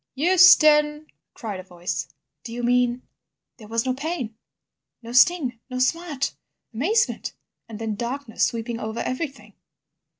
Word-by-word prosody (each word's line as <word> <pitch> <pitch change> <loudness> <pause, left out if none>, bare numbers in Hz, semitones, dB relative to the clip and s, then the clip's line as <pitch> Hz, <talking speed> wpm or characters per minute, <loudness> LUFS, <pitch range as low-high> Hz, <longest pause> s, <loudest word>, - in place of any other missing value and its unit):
"Euston!" 305 -2 +6 0.3
cried 215 -7 -6
a - - -8
voice. 175 -1 -5 0.4
"Do 230 - -8
you 240 +1 -5
mean—?" 245 0 +2 0.5
"There 215 -4 -13
was 230 +2 -1
no 255 - +1
pain, 270 -5 -4 0.7
no 230 - -8
sting 255 -2 +3
or 255 0 -4
smart. 290 +1 -1 0.4
Amazement 380 - 0 0.4
and 220 - -7
then 225 -1 -3
darkness 240 +2 -3
sweeping 230 0 -1
over 220 0 -4
everything. 275 +2 -5
255 Hz, 130 wpm, -24 LUFS, 230-300 Hz, 0.7 s, Euston